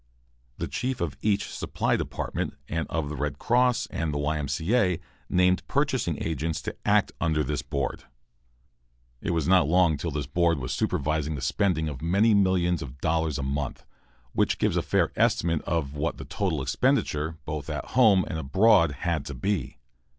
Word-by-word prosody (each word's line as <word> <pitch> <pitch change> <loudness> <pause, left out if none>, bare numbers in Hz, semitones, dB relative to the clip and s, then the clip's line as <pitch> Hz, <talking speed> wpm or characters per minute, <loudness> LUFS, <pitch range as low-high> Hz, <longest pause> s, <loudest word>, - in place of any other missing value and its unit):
The - - -3
chief 130 -2 -2
of 80 -6 -2
each 105 -1 +1
supply - - -1
department - - -3
and 80 +1 -2
of 80 -3 -2
the 75 - -5
Red 75 +1 -2
Cross 125 0 +2
and 80 -2 -2
the 75 - -2
Y. 75 +2 0
M. 70 - -3
C. 80 - -1
A. 90 -8 +2 0.3
named 90 0 +3
purchasing 130 - 0
agents 80 0 -2
to - - -4
act - - +3
under 80 -2 +1
this 75 +1 -2
board. 70 -2 -3 1.2
It - - -3
was 80 -3 0
not 90 -4 +5
long 85 -2 +3
till 85 - -3
this 75 -1 -3
board 85 +2 +2
was 65 -2 -3
supervising 75 +1 -1
the - - -5
spending 80 +2 +1
of 70 -4 -5
many 100 +7 +3
millions 90 -4 +2
of 70 0 -8
dollars 80 -1 0
a 70 - -3
month, 70 +1 -3 0.5
which - - +1
gives - - +1
a - - +2
fair - - +1
estimate 85 -2 +2
of 75 -4 -1
what 75 +2 -2
the - - -8
total 85 -9 -1
expenditure, 75 +4 0
both 75 -1 -4
at 75 -2 -4
home 110 -7 +5
and 80 - -3
abroad, 85 +1 +4
had 85 -3 0
to 70 - -5
be. 95 +3 -2
80 Hz, 180 wpm, -26 LUFS, 75-90 Hz, 1.2 s, not